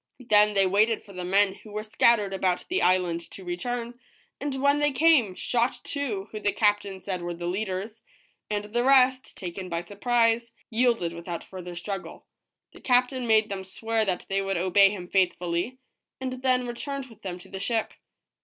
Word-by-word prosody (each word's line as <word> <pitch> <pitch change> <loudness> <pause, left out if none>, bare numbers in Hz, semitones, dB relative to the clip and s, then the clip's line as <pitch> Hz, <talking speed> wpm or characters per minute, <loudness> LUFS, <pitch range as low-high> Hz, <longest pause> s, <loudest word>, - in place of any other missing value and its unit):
Then 210 0 +5
they 195 -1 +4
waited 210 +4 +2
for 200 - -14
the 180 -1 -5
men 195 +2 +3
who 210 +2 -15
were 210 +1 -4
scattered 215 -2 +3
about 185 -2 0
the 370 +2 +1
island 180 -2 +2
to 195 - -10
return, 240 +7 -4 0.4
and 275 -2 -3
when 280 +1 +3
they 295 0 +3
came, 270 - +4
shot 240 +4 0
two 225 -9 -3
who 215 - -5
the 205 -1 +1
cap 205 -1 +3
tain 195 -2 -9
said 185 -3 -3
were 175 0 -4
the 175 +1 -6
leaders; 195 +4 -3 0.5
and 210 -1 -2
the 235 +3 -1
rest, 260 -1 +4
taken 185 0 -6
by 170 -1 -2
surprise, 230 +4 +1 0.2
yielded 230 -7 +1
without 170 0 -6
further 180 -2 -8
struggle. 195 +2 -6 0.5
The - - -15
captain 250 0 +2
made 220 -1 +4
them 195 -1 -3
swear 225 +4 -1
that 185 -3 -2
they 195 0 0
would 195 -1 -1
obey 190 +3 +5
him 190 -3 -6
faithfully, 180 +4 0 0.4
and 255 -1 -4
then 255 -1 +2
returned 275 +3 -4
with 225 -4 -17
them 180 -2 -5
to 180 +1 -14
the 190 - -6
ship. 225 +2 -1
210 Hz, 185 wpm, -26 LUFS, 185-240 Hz, 0.5 s, Then